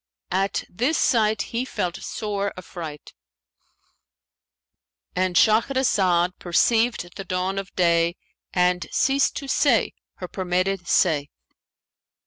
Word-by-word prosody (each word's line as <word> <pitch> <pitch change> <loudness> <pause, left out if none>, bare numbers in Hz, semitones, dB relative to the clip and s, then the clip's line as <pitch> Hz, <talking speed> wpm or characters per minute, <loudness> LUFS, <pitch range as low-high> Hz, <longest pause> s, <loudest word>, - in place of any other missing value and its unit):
At 195 +2 0
this 250 - 0
sight 220 -3 +2
he 230 - 0
felt 180 -9 -3
sore 200 -2 -3
affright"—And 160 - -10
Shahrazad 210 -6 +3
perceived 215 +1 +1
the 195 - -5
dawn 185 +1 -2
of 195 - -7
day 170 -1 +2 0.4
and 180 0 +1
ceased 275 +1 +2
to 280 - -5
say 265 -3 +2 0.2
her 180 - -7
permitted 185 0 -1
say. 150 -5 +2
185 Hz, 100 wpm, -23 LUFS, 175-220 Hz, 0.4 s, Shahrazad